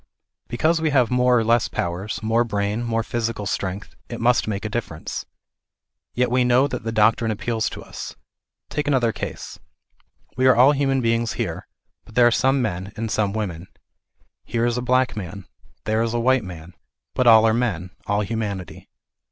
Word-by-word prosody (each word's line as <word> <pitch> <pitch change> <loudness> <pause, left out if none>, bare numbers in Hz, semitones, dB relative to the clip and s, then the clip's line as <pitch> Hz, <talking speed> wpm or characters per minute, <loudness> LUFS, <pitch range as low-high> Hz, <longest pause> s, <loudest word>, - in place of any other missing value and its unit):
Because 160 +7 +1
we 160 - +2
have 130 -4 +2
more 125 0 +4
or 115 - +2
less 115 +1 +3
powers, 90 +4 -3
more 115 +2 +2
brain, 105 0 -2
more 115 -1 -1
physical 115 -2 -3
strength; 95 0 -3 0.2
it 120 - -6
must 120 0 +2
make 105 -1 -3
a - - +1
difference. 105 -8 -5 0.9
Yet 125 0 +1
we 125 0 +3
know 125 +3 +4
that 125 -4 -5
the 115 - -2
doctrine 110 +1 +3
appeals 110 +1 -1
to - - -9
us. - - -8 0.5
Take 145 0 -3
another 130 -5 +2
case. - - -7 0.8
We 130 +1 +3
are 130 - +6
all 130 +4 +6
human 135 -2 +1
beings 115 -1 0
here, 90 -9 -4 0.4
but 110 - -17
there 125 - +6
are 120 - +5
some 130 +2 +2
men, 95 -2 -3
and 110 0 -4
some 105 -2 +1
women. 95 -5 -4 0.8
Here 115 0 -1
is 120 -1 +1
a 125 - -2
black 130 0 +1
man, 100 -1 -7 0.4
there 110 +1 +1
a 115 +1 0
white 130 0 +3
man, 90 -2 -9 0.4
but 130 - +1
all 110 -1 +8
are 110 - +4
men, 95 -7 -1 0.2
all 100 +1 +1
humanity. 105 -4 -4
115 Hz, 180 wpm, -22 LUFS, 105-125 Hz, 0.9 s, all